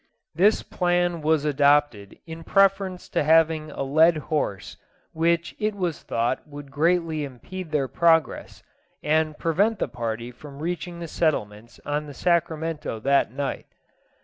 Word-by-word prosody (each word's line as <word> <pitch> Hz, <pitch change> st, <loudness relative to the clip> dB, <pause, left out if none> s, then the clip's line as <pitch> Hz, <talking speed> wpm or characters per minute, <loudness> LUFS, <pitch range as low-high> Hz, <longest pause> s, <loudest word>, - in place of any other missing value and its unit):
This 195 Hz, +7 st, +3 dB
plan 175 Hz, -2 st, 0 dB
was 155 Hz, -1 st, +1 dB
adopted 145 Hz, -7 st, +2 dB
in 165 Hz, 0 st, -9 dB
preference 195 Hz, -1 st, +2 dB
to -, -, 0 dB
having 160 Hz, 0 st, +3 dB
a 140 Hz, -, -4 dB
led 155 Hz, +4 st, +4 dB, 0.2 s
horse, 100 Hz, -, -2 dB, 0.4 s
which 170 Hz, +1 st, 0 dB
it 215 Hz, -1 st, -1 dB
was 180 Hz, -5 st, -3 dB
thought 120 Hz, +5 st, -2 dB
would 145 Hz, -1 st, -10 dB
greatly 165 Hz, 0 st, +1 dB
impede 160 Hz, +7 st, -8 dB
their 145 Hz, -3 st, 0 dB
progress, 165 Hz, +2 st, +1 dB, 0.4 s
and 155 Hz, 0 st, +1 dB
prevent 200 Hz, +7 st, +1 dB
the -, -, -1 dB
party 115 Hz, -1 st, -5 dB
from 140 Hz, +3 st, -12 dB
reaching 175 Hz, +2 st, -4 dB
the 170 Hz, -, -5 dB
settlements 115 Hz, -10 st, -2 dB
on 150 Hz, +1 st, -2 dB
the 145 Hz, -, -10 dB
Sacramento 165 Hz, -6 st, -1 dB
that 140 Hz, -1 st, +2 dB
night. 140 Hz, +1 st, -4 dB
155 Hz, 140 wpm, -24 LUFS, 140-170 Hz, 0.4 s, led